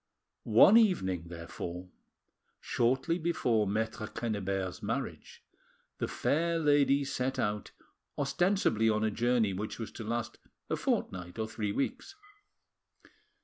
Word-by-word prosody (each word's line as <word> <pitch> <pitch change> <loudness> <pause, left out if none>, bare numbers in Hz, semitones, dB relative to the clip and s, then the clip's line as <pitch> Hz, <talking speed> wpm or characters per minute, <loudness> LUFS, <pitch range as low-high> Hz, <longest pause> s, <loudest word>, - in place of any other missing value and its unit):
One 120 - +7
evening, 95 - +2
therefore, 85 +1 -7 0.7
shortly 130 +8 0
before 120 - +1
Maitre 110 +1 -2
Quennebert's 100 -5 -3
marriage, - - -5 0.6
the - - -1
fair 170 +3 0
lady 145 -2 +3
set 135 -1 -2
out, 105 -4 -1 0.5
ostensibly 145 - +2
on 110 0 +1
a 110 - +1
journey 120 -2 +1
which 105 +3 -4
was 115 - -6
to 115 - -8
last 115 +1 -3 0.3
a - - +3
fortnight 90 +1 -2
or 110 -1 -2
three 105 -2 -3
weeks. 260 - -3
115 Hz, 115 wpm, -31 LUFS, 105-140 Hz, 0.7 s, One